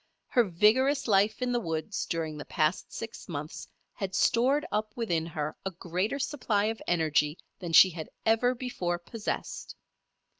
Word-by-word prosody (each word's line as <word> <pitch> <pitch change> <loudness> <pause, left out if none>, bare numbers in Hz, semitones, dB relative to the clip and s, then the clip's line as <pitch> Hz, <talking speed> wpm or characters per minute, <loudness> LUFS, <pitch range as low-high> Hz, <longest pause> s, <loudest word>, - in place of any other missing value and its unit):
Her 245 - +4
vigorous 230 - +3
life 215 +3 +3
in 250 - 0
the 240 - +2
woods 165 +1 -3
during 160 -2 -2
the - - -6
past 155 +3 0
six 225 -4 -7
months 150 -1 -6 0.3
had 195 -1 -4
stored 260 +9 +3
up 215 0 -1
within 170 -9 0
her 150 -2 -3
a 195 - -1
greater 185 +7 -2
supply 245 -7 0
of 225 - -17
energy 155 -2 +2 0.2
than 175 -2 -5
she 185 +3 +9
had 160 -2 -7 0.2
ever 235 +3 +3
before 185 -9 -2
possessed. 205 +6 -5
195 Hz, 155 wpm, -29 LUFS, 165-235 Hz, 0.3 s, she